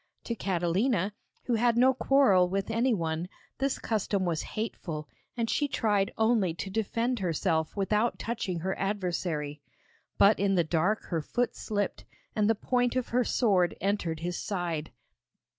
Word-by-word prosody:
To 235 - -3
Catalina, 195 +2 0 0.3
who 245 - -1
had 235 +1 +3
no 260 +2 +6
quarrel 255 -10 +4
with 195 +3 -2
any 235 +3 +2
one, 165 -3 -1 0.3
this 270 0 0
custom 205 -3 -1
was 165 -3 0 0.2
hateful, 165 -8 -4 0.3
and 230 -1 0
she 290 +5 +1
tried 205 -7 +1
only 220 -7 +2
to 190 +3 -5
defend 230 +3 -1
herself 165 -3 0
without 210 +4 +1
touching 190 -7 -3
her 190 +2 -1
adversary. 175 -7 -2 0.6
But 205 +2 +5
in 195 0 +2
the 175 - +4
dark 175 +7 +1
her 165 -3 0
foot 245 +10 -1
slipped 205 -3 -2 0.3
and 210 0 +2
the 225 - +4
point 245 +3 0
of 255 -2 -1
her 250 +1 +2
sword 195 -9 +2
entered 180 -5 -1
his 175 +1 -3
side. 175 -6 -3
200 Hz, 155 wpm, -29 LUFS, 175-230 Hz, 0.6 s, no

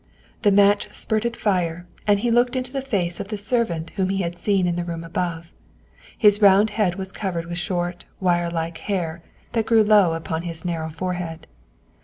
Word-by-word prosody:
The 205 - +4
match 205 +1 +4
spurted 230 +2 -1
fire 175 -4 0 0.2
and 205 -1 +4
he 240 0 +1
looked 240 +2 +3
into 255 0 -3
the 270 - -1
face 185 -10 -1
of - - -4
the 210 0 -4
servant 200 -7 -1
whom 190 -2 -1
he 195 0 0
had 170 0 -3
seen 195 0 +1
in 175 -1 0
the 175 - -2
room 170 -1 -5
above. 165 0 -4 0.6
His 210 -1 +5
round 200 +1 +6
head 205 -5 +1
was 190 -1 -5
covered 180 -5 -3
with 170 +1 -4
short, 175 0 -3
wire 175 -2 +1
like 165 -1 -3
hair 170 -5 -3 0.3
that 225 -2 -1
grew 225 -2 +5
low 205 -5 +5
upon 165 0 -3
his 165 -1 -4
narrow 165 -2 -2
forehead. 175 0 -4
185 Hz, 190 wpm, -23 LUFS, 170-210 Hz, 0.6 s, round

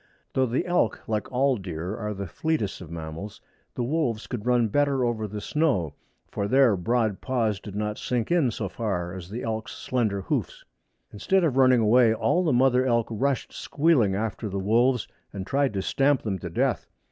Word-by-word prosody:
Though 130 -1 +2
the 125 +8 -1
elk, 175 -10 0
like 110 +1 -2
all 130 0 +2
deer, 90 0 -5
are 105 -1 -4
the 100 0 -4
fleetest 110 - -2
of 85 - -9
mammals, 85 +4 -7 0.4
the 125 - -1
wolves 125 -5 -1
could 120 -2 -5
run 120 -2 +3
better 140 +2 +1
over 110 -2 -1
the 105 +1 -6
snow, 130 - 0 0.4
for 100 - -2
their 130 -2 +4
broad 110 +2 0
paws 115 -6 0
did 100 0 -9
not 105 0 -2
sink 120 0 -2
in 165 -7 +3
so 105 -2 -3
far 90 -4 -3
as 90 -2 -8
the 115 +5 -5
elk's 110 -1 -3
slender 110 -6 -1
hoofs. - - -3 0.5
Instead 190 -1 +1
of 150 -6 +1
running 130 -2 +5
away 115 +1 +5
all 115 +12 +1
the 160 - +2
mother 130 0 +4
elk 115 -3 +1
rushed 130 +4 -1
squealing 140 -11 +2
after 110 +1 -3
the 100 - -4
wolves 115 +5 +2 0.2
and 95 -2 -6
tried 140 +4 +1
to 95 - -1
stamp 135 +3 +2
them 95 -4 -2
to - - -6
death. - - 0
115 Hz, 190 wpm, -26 LUFS, 100-130 Hz, 0.5 s, running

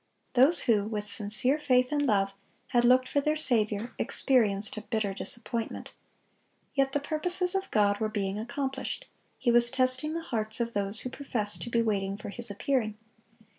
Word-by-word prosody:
Those 270 +7 +5
who 210 -3 +2
with 210 -1 -4
sincere 215 +7 +2
faith 255 -3 +2
and 295 -1 +1
love 195 -3 +1 0.4
had 240 -1 +2
looked 255 +1 +4
for 285 - 0
their 300 +2 +1
Saviour, 225 -6 +1
experienced 215 -6 +2
a 215 - -5
bitter 215 -3 -2
disappointment. 230 +3 -4 0.8
Yet 270 -1 +1
the 290 - +1
purposes 355 +5 0
of 385 0 -2
God 205 -1 +2
were 220 -1 -1
being 200 -1 -2
accomplished: 265 +3 -4 0.3
He 245 - +1
was 240 0 +6
testing 260 +4 0
the 335 - -3
hearts 220 -5 -3
of 235 0 -2
those 200 +1 0
who 255 - -5
professed 230 -7 -2
to - - -4
be 235 0 +1
waiting 200 -3 -1
for 210 - -8
His 235 +2 -1
appearing. 215 0 -1
235 Hz, 170 wpm, -28 LUFS, 210-270 Hz, 0.8 s, was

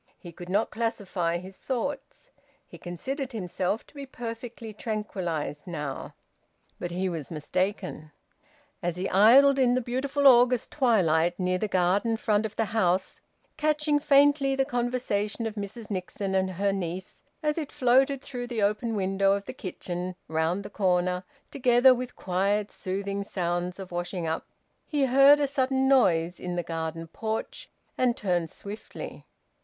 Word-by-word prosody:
He 175 - -11
could 175 +1 -10
not 205 +4 +1
classify 195 -7 -1
his 185 +2 -10
thoughts. 280 - -4 0.3
He - - -13
considered 265 - -4
himself 190 0 -2
to - - -22
be 280 -2 -8
perfectly 230 -2 -7
tranquillised 185 -9 -4
now, 150 -5 -5 0.6
but 175 - -3
he 180 +2 -1
was 165 -6 -4
mistaken. 180 0 -3 0.7
As 175 -2 -1
he 185 +1 -2
idled 265 +8 +6
in 250 -2 +4
the - - +2
beautiful 270 +4 -1
August 250 -2 +6
twilight 175 - +2
near 185 0 0
the 215 - -1
garden 195 +5 +2
front 215 -1 +1
of 215 - -16
the 225 - +1
house, 185 -3 +1 0.4
catching 300 -1 +2
faintly 280 -1 +4
the 270 0 +2
conversation 240 -4 -1
of 220 - -2
Mrs 210 +1 -7
Nixon 190 +1 -3
and 190 0 +1
her 200 +2 +1
niece 185 -1 -5 0.2
as 300 +2 +1
it 300 - -5
floated 265 +2 +3
through 245 -3 -5
the 235 -4 -1
open 215 +3 0
window 195 0 +2
of 200 0 -2
the - - -6
kitchen, 180 -1 -5
round 160 +5 0
the 205 - -9
corner, 180 -2 +1 0.3
together 255 -1 +5
with 250 0 -5
quiet 200 +3 0
soothing 200 +1 -3
sounds 175 -1 -2
of 190 -2 -8
washing 175 0 -3
up, 160 0 -2 0.4
he 290 -3 +1
heard 275 +3 +7
a 290 - +2
sudden 265 -1 +1
noise 175 -10 +3
in 180 -1 -4
the 175 - -1
garden 165 0 -4
porch, 220 +6 -5 0.3
and 250 -2 +2
turned 175 -4 0
swiftly. 205 +6 -9
205 Hz, 155 wpm, -27 LUFS, 180-250 Hz, 0.7 s, heard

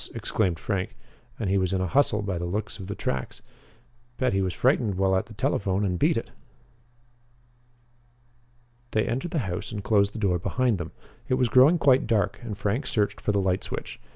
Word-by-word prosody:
exclaimed 90 -6 0
Frank. 100 +4 -3 0.4
"And 110 - -1
he 95 +1 +2
was 95 0 0
in 95 - +1
a 95 - 0
hustle, 105 0 +2
by 95 -4 -2
the 85 - -3
looks 105 +4 -4
of 95 - -7
the 100 - -4
tracks. 65 -1 -4 0.7
Bet 130 -3 +1
he 95 - +2
was 95 -2 -1
frightened 120 -6 +2
while 95 0 +2
at 95 - 0
the 110 - -12
telephone 100 -1 0
and 90 -2 -1
beat - - +3
it." - - -4 2.6
They 110 - +2
entered 135 +8 -2
the 165 - -2
house 90 +3 -4
and 105 -3 -5
closed 100 -2 +3
the - - -7
door 95 -5 +1
behind 120 +2 0
them. 85 -2 -5 0.4
It 130 - +3
was 125 -2 +2
growing 135 +8 +6
quite 135 -6 +4
dark 105 -3 +1
and 110 -4 -6
Frank 110 +8 -1
searched 105 -2 0
for - - +1
the 100 - +1
light 95 -1 0
switch. - - -6
100 Hz, 200 wpm, -26 LUFS, 95-115 Hz, 2.6 s, growing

